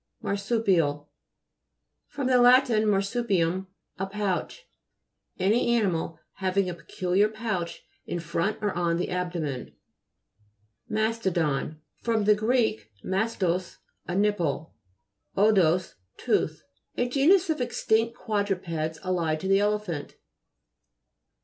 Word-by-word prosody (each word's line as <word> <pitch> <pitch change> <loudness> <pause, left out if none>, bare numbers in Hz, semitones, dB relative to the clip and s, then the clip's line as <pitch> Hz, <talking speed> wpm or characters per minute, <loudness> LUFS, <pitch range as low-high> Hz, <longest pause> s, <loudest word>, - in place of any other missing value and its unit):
MAHSU'PIAL 195 -8 +1 1.0
fr. 290 -1 -5
lat. 250 0 +6
marsupium, 195 -4 +1 0.3
a 190 - -1
pouch. 205 - -3 0.7
Any 230 +5 +2
animal 170 -7 0 0.2
having 190 0 +1
a 180 - -2
pe 170 - -15
culiar 190 +4 +1
pouch 215 -6 -4 0.2
in 175 - -2
front 170 +6 -1
or 205 - 0
on 170 -1 0
the 180 - -2
ab 180 -1 -2
domen. 150 -7 -4 1.1
MA'STODON 180 -9 -1 0.2
fr. 230 - 0
gr. 215 +2 +2 0.5
mastos, 190 -3 -1 0.3
a 175 - -3
nipple, 180 -6 0 0.6
odous, 185 -4 +3 0.2
tooth. - - 0 0.3
A 245 - +1
genus 325 +8 +4
of 300 - -2
extinct 230 -1 +1
quadrupeds 180 -7 -2
allied 170 -4 0
to 190 - -3
the 195 0 +4
elephant. 205 -7 -2
195 Hz, 105 wpm, -27 LUFS, 175-220 Hz, 1.1 s, lat